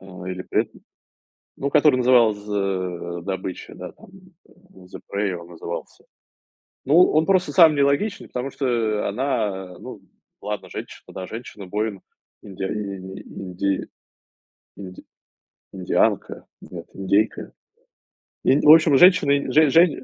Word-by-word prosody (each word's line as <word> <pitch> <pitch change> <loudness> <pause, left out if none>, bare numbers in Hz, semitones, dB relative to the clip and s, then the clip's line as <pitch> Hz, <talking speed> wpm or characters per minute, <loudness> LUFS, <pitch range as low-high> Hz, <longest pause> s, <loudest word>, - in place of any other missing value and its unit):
ой, 95 -1 -8
или 90 0 -6
пред - - -1 0.9
ну, 140 - -2
который 150 -1 +4
назывался, 115 -5 +2
э, 90 -3 -3
"Добыча", 95 0 -6
да, - - -9
там - - -18 0.4
"The 180 - -15
Prey" 100 -1 -1
он 85 0 -10
назывался. 85 0 -8 0.8
Ну, 145 +4 +2 0.2
он 155 +1 +2
просто 185 0 +2
самый 160 -5 +6
нелогичный, 140 +9 0
потому 125 +2 -5
что 115 -6 -1
она, 105 -7 -3
ну, - - -10 0.4
ладно, 105 +1 -6
женщина, - - -9
да, 95 - -7
женщина-воин, 105 -2 -5 0.4
индиа 95 -1 -5
э, - - -5
инди 95 -1 -5 0.9
инди 95 -2 -10 0.7
индианка, 95 -2 -1 0.2
нет, - - -10
индейка. 100 +3 0 0.9
Инди 135 +3 +3
в - - +11
общем, 160 -3 +6
женщина-инд 145 -6 +4
жень 155 -2 +4
жень 165 -3 +4
105 Hz, 120 wpm, -22 LUFS, 95-140 Hz, 0.9 s, в